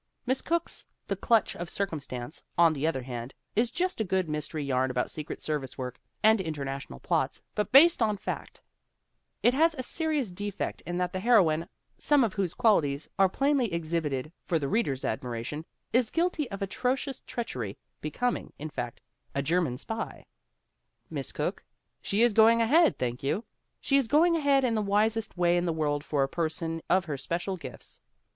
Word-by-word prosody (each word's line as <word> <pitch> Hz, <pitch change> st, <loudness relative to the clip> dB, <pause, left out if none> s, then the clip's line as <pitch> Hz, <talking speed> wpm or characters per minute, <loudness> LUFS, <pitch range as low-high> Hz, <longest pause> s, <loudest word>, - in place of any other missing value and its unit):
Miss 260 Hz, +2 st, +1 dB
Cooke's 340 Hz, +1 st, -2 dB, 0.2 s
The -, -, -1 dB
Clutch 230 Hz, -2 st, +2 dB
of 175 Hz, -1 st, -5 dB
Circumstance, 150 Hz, -8 st, -4 dB
on 170 Hz, -2 st, +6 dB
the 150 Hz, +1 st, -1 dB
other 135 Hz, -6 st, -1 dB
hand, 120 Hz, 0 st, -6 dB, 0.2 s
is 230 Hz, +2 st, +3 dB
just 365 Hz, -5 st, -1 dB
a -, -, +3 dB
good 190 Hz, -3 st, 0 dB
mystery 150 Hz, 0 st, -3 dB
yarn 130 Hz, -1 st, +1 dB
about 125 Hz, -1 st, -1 dB
secret 155 Hz, -1 st, -6 dB
service 145 Hz, -4 st, -3 dB
work 125 Hz, -2 st, -5 dB, 0.2 s
and 220 Hz, -1 st, +6 dB
international 140 Hz, -, -5 dB
plots -, -, -1 dB
but 210 Hz, -, -1 dB
based 305 Hz, +3 st, +7 dB
on 215 Hz, -2 st, +2 dB
fact -, -, -6 dB, 0.8 s
It 245 Hz, -, +5 dB
has 320 Hz, +4 st, +3 dB
a 255 Hz, -, -4 dB
serious 300 Hz, -, -1 dB
defect 205 Hz, +2 st, -4 dB
in 175 Hz, 0 st, -2 dB
that 180 Hz, -1 st, -1 dB
the 185 Hz, -, -1 dB
heroine, 180 Hz, -8 st, +4 dB, 0.3 s
some 290 Hz, -3 st, +4 dB
of 220 Hz, -5 st, 0 dB
whose 190 Hz, -4 st, -1 dB
qualities 150 Hz, -10 st, +2 dB
are 195 Hz, -1 st, +6 dB
plainly 275 Hz, 0 st, +1 dB
exhibited 155 Hz, -4 st, -2 dB
for 170 Hz, -, +1 dB
the 145 Hz, -3 st, -2 dB
read 225 Hz, +9 st, +1 dB
er's 135 Hz, -1 st, -3 dB
admiration, 125 Hz, +6 st, -3 dB, 0.3 s
is 245 Hz, -2 st, +3 dB
guilty 330 Hz, -5 st, 0 dB
of 200 Hz, -1 st, -4 dB
atrocious 255 Hz, +7 st, -1 dB
treachery, 125 Hz, -, -4 dB, 0.2 s
be 155 Hz, -, -3 dB
coming, 245 Hz, +10 st, -2 dB
in 155 Hz, +1 st, -6 dB
fact, 120 Hz, -, -5 dB, 0.3 s
a 140 Hz, -, 0 dB
German 160 Hz, -4 st, +1 dB
spy! 225 Hz, -, -5 dB, 0.9 s
Miss -, -, -4 dB
Cooke? -, -, -3 dB, 0.4 s
She 205 Hz, +4 st, +2 dB
is 240 Hz, -2 st, +4 dB
going 225 Hz, +2 st, +6 dB
ahead, 300 Hz, +9 st, +4 dB
thank 125 Hz, 0 st, -2 dB
you! 145 Hz, +11 st, -1 dB, 0.4 s
She 275 Hz, -, +2 dB
is 270 Hz, -4 st, +2 dB
going 330 Hz, +6 st, +4 dB
ahead 280 Hz, -4 st, +3 dB
in 245 Hz, -3 st, +2 dB
the 215 Hz, -, +1 dB
wisest 210 Hz, +1 st, +1 dB
way 175 Hz, 0 st, +3 dB
in 175 Hz, -, +1 dB
the 170 Hz, -, +1 dB
world 145 Hz, -2 st, 0 dB
for 145 Hz, -2 st, +1 dB
a -, -, +1 dB
person 165 Hz, +1 st, -2 dB
of 185 Hz, 0 st, +3 dB
her 150 Hz, -4 st, -3 dB
special 175 Hz, +7 st, -2 dB
gifts. 130 Hz, -9 st, -8 dB
180 Hz, 180 wpm, -29 LUFS, 150-235 Hz, 0.9 s, based